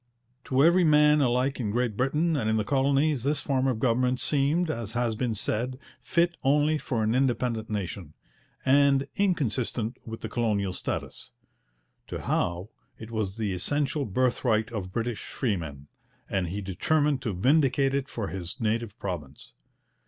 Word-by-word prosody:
To 130 +1 +3
every 175 +3 +5
man 150 -1 +5
alike 130 +2 +1
in 110 -4 -1
Great 120 0 0
Britain 150 +7 +1
and 115 -6 0
in 110 - +2
the 110 - +1
colonies 140 +2 +2
this 145 +4 0
form 135 -2 0
of 130 -4 0
government 125 +2 +1
seemed, 155 +4 +1
as 115 -6 -5
has 120 -1 0
been 115 0 -2
said, 120 +5 -2 0.2
fit 170 0 +1
only 150 +2 +3
for 115 -7 -2
an 110 +1 +1
independent 120 -3 0
nation, 95 -6 -4 0.5
and 140 0 +4
inconsistent 130 - 0
with 115 0 -8
the - - -4
colonial 105 -4 0
status. - - -5 0.7
To - - -5
Howe 90 +4 -1 0.3
it 110 +1 -10
was 110 -3 -2
the 105 -4 -1
essential 145 - -1
birthright 110 0 +1
of 95 -5 -5
British 115 +1 -3
freemen, 80 - -3 0.4
and 95 -3 -1
he 100 +5 -4
determined 145 - +1
to 110 -5 -2
vindicate 135 - +3
it 140 0 -1
for 105 -6 -4
his 90 - -5
native 115 -1 -1
province. 80 - -6
120 Hz, 155 wpm, -27 LUFS, 105-140 Hz, 0.7 s, every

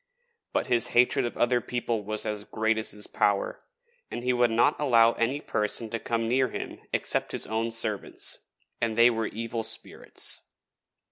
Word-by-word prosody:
But - - 0
his 120 -1 +2
hatred 125 0 +4
of - - -8
other 120 0 +2
people 120 -3 -2
was 110 +1 -4
as 105 -1 -3
great 110 +1 0
as 110 - -3
his 105 0 -4
power, - - 0 0.5
and 120 - -6
he 125 0 +1
would 120 -1 +3
not 115 +1 +2
allow 115 -5 +5
any 120 +5 -1
person 110 -3 -1
to 115 - -2
come 115 0 -2
near 130 +2 +2
him - - -6
except - - 0
his - - -1
own 110 +1 -1
servants, 110 -3 0 0.4
and 115 -1 0
they 120 +1 +7
were 115 -1 -2
evil 115 +1 -4
spirits. 110 0 +1
115 Hz, 175 wpm, -27 LUFS, 110-120 Hz, 0.5 s, they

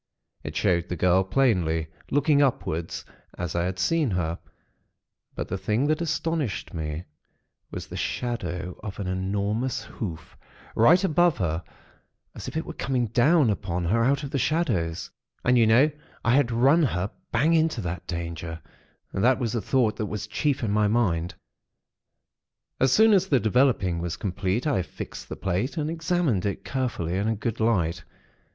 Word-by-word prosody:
It - - -6
showed 85 0 +1
the 90 - -2
girl 90 +3 +3
plainly, 90 -9 +1 0.2
looking 145 +1 +3
upward, 90 - 0 0.5
as 90 -1 -3
I 85 0 0
had 90 0 -3
seen 150 - +1
her; 85 -3 -1 1.0
but - - -3
the 95 - -3
thing 105 +8 0
that 155 +2 +1
astonished 160 - -2
me, 80 0 -4 0.7
was - - -6
the - - -9
shadow 90 -8 -3
of 105 -1 -7
an 100 - -3
enormous 100 +6 -1
hoof, 85 -8 -7 0.4
right 170 - +5
above 175 -1 +3
her, 85 -2 -1 0.7
as - - -8
if - - -4
it 160 - -2
were 170 - -6
coming 125 -6 -1
down 130 +2 +4
upon 90 -3 -2
her 115 +7 +2
out 140 +4 +2
of 140 - -5
the 140 - 0
shadows. 115 - 0 0.3
And, 125 - +4
you 115 -2 +5
know, 130 +8 +5 0.3
I 120 - +4
had 135 -3 +4
run 135 +8 +4
her 100 - 0 0.2
bang 145 +8 +3
into 160 -5 +2
that 90 -2 -5
danger. 85 -1 -5 0.5
That 120 +7 +3
was 120 -5 -2
the 115 - -1
thought 120 0 +1
that 110 -3 -2
was 105 -1 -4
chief 125 +6 -1
in 105 - 0
my 105 0 +3
mind. 90 -7 +1 1.4
"As 130 -1 +3
soon 220 +7 +6
as 190 -1 +3
the 140 -8 +3
developing 110 -6 +2
was 85 -1 -3
complete, 100 - -1
I 140 -11 +2
fixed - - -8
the - - -4
plate, 95 - -2
and 155 0 -1
examined 165 - 0
it 100 -1 -3
carefully 120 -10 -2
in 100 +2 0
a 110 - +1
good 115 +2 -3
light. 95 -8 +1
110 Hz, 170 wpm, -26 LUFS, 90-135 Hz, 1.4 s, soon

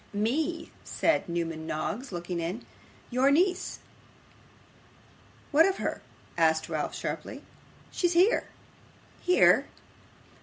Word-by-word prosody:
'Me,' 295 +11 -1
said 325 - 0
Newman 165 -2 -3
Noggs, 210 - -3
looking 175 0 -4
in. 175 +8 -4 0.5
'Your 255 +3 +3
niece.' 360 +6 +2 1.7
'What 315 +4 +6
of 390 - -1
her?' - - -3 0.4
asked 160 -1 +3
Ralph 155 -2 -2
sharply. - - -5 0.5
'She's 350 -1 +1
here.' 365 +6 +4 0.8
'Here! 360 - +5
235 Hz, 100 wpm, -28 LUFS, -, 1.7 s, What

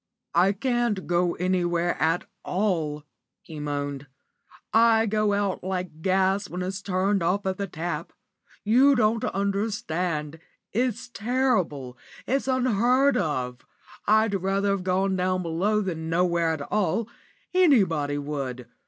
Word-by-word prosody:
"I 180 +3 +4
can't 240 -3 -1
go 175 0 +1
anywhere 175 -1 0
at 165 +2 +1 0.2
all," 165 -7 -1 0.4
he 155 -2 -9
moaned; 145 -1 -4 0.7
"I 225 0 +5
go 215 -1 +1
out 200 -2 -1
like 180 -4 -4
gas 190 +2 +1
when 180 +1 -4
it's 190 +1 -4
turned 195 +1 0
off 190 +4 0
at 190 -1 -1
the 200 - -2
tap. 175 0 -4 0.5
You 260 +6 +5
don't 225 -1 +2
understand 180 -6 -2 0.3
it's 245 +2 -1
terrible, 210 - -1 0.3
it's 270 +1 0
unheard 255 +2 +3
of. 125 -8 -2 0.5
I'd 215 0 +4
rather 195 +1 0
have 200 -2 0
gone 190 +1 +1
down 185 0 0
below 190 +6 0
than 165 -5 -4
nowhere 170 0 +2
at 160 -2 -2
all 210 +4 0 0.5
anybody 190 - +3
would. 140 -4 -4
185 Hz, 125 wpm, -25 LUFS, 165-215 Hz, 0.7 s, I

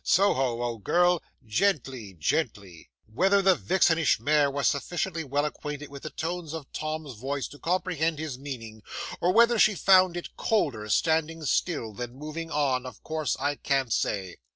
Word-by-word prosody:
Soho, 130 -11 +2
old 115 -4 -4
girl 175 - +3 0.2
gently 125 - -1
gently." 100 - -2 0.2
'Whether 190 - +2
the 190 0 +6
vixenish 165 -7 +2
mare 145 +4 +3
was 140 0 0
sufficiently 165 +4 -1
well 145 +1 0
acquainted 150 -1 -5
with 140 -1 -10
the 155 - -5
tones 165 -1 -4
of 160 -4 -6
Tom's 155 -2 -4
voice 135 +5 -3
to 145 - -13
comprehend 170 -3 0
his 150 -4 -5
meaning, 115 -6 -7 0.4
or 180 - +2
whether 235 +2 +5
she 210 -1 +5
found 185 -1 +5
it 175 - -7
colder 120 - 0
standing 160 - +1
still 140 -8 0
than 120 +3 -6
moving 155 +3 -6
on, 135 -4 0
of 125 - -11
course 155 -1 -2
I 145 +1 -1
can't 135 -4 0
say. 95 -6 -1
150 Hz, 160 wpm, -27 LUFS, 125-170 Hz, 0.4 s, the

